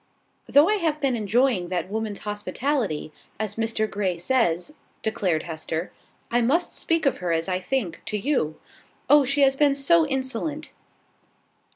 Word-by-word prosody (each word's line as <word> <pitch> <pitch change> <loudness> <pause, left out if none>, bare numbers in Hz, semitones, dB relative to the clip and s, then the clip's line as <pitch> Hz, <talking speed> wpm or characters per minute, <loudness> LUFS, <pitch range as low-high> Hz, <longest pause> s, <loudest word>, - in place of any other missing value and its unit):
"Though 290 +4 +6
I 425 +1 +2
have 320 -5 0
been 275 -4 +1
enjoying 220 -3 +1
that 180 0 -2
woman's 215 -1 -3
hospitality, 210 - -2 0.3
as 215 -2 -2
Mr 225 0 -1
Grey 195 -4 -2
says," 180 - 0 0.3
declared 185 -7 0
Hester, 160 +1 -4 0.4
"I 240 +1 +3
must 310 +9 +1
speak 330 -1 0
of 275 - +1
her 180 -2 -2
as 165 +1 0
I 185 -1 0
think, 185 -4 -2
to 210 - -1
you. 205 - -1 0.5
Oh, 295 -1 +7
she 280 +2 +1
has 270 -1 +5
been 285 0 +3
so 320 +4 +3
insolent!" 270 +3 -3
230 Hz, 155 wpm, -25 LUFS, 185-280 Hz, 0.5 s, Oh